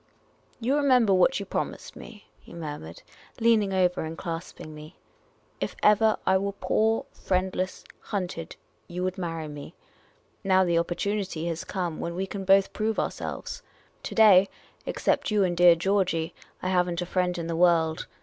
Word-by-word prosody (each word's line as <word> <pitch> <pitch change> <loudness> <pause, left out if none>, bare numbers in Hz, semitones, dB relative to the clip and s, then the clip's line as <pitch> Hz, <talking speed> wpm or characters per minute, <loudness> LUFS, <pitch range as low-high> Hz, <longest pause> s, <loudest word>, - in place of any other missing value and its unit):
" - - -36
You 255 +5 +1
remember 255 -8 +4
what 190 +8 +3
you 200 - -5
promised - - -4
me? 215 -3 -12
" - - -38
he - - -14
murmured, 145 - -7 0.4
leaning 225 -3 +3
over 180 -2 +1
me 160 - -3
and 165 +1 -7
clasping 165 -2 -6
me. 155 +3 -11 0.3
" - - -37
If - - -3
ever 215 +1 +5
I 190 0 +4
were 200 +1 -2
poor, 220 +2 +1
friendless, 185 0 -2 0.2
hunted 180 -5 -5 0.2
— - - -40
you 180 +1 -4
would 185 +1 -2
marry 165 -3 -4
me. 150 +3 -9 0.7
Now 190 -1 +4
the 170 -1 +1
oppor 170 +1 -1
tunity 195 -5 -2
has 165 0 -4
come 175 -5 -4
when 170 0 -4
we 190 +2 -2
can 195 0 -6
both 195 +1 +4
prove 220 +1 -1
ourselves. - - -4 0.4
To - - -6
day, 200 -4 +7 0.4
except - - 0
you 210 -2 +2
and 175 -2 0
dear 175 0 +7
Georgey, 175 -2 0 0.3
I 185 - 0
have 180 -1 +2
n't 175 0 -2
a - - -5
friend 180 0 -1
in 170 - -4
the 165 0 -3
world. 165 -2 +2
185 Hz, 185 wpm, -26 LUFS, 170-200 Hz, 0.7 s, day